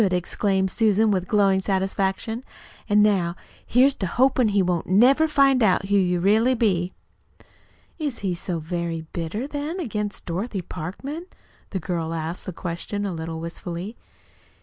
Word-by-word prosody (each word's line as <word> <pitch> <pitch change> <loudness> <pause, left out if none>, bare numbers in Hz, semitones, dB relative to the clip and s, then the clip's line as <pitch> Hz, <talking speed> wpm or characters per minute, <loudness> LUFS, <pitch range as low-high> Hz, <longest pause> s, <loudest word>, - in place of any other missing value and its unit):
exclaimed 190 +1 0
Susan 220 -1 +3
with 185 -2 0
glowing 195 -2 +3
satisfaction. 195 +4 -1 0.5
"An' 210 0 +5
now 185 -5 +2 0.3
here's 260 +3 +4
to 190 - -2
hopin' 255 +4 +3
he 200 -2 +2
won't 175 -2 -1
never 255 - +5
find 275 -3 +4
out 195 -2 +2
who 200 - +3
you 180 -2 +2
really 220 +7 +3
be!" 185 -6 +1 1.1
"Is 290 -6 -2
he 185 - +1
so 175 0 -3
very 165 0 -3
bitter, 170 +9 -3
then, 295 +5 -4
against 210 - -4
Dorothy 190 +3 -3
Parkman?" 275 - -6 0.4
The 190 - -3
girl 165 -1 -3
asked 165 +2 -5
the - - -2
question 175 +4 -4
a 195 - -2
little 160 0 -5
wistfully. 170 +5 -6
195 Hz, 150 wpm, -24 LUFS, 175-225 Hz, 1.1 s, An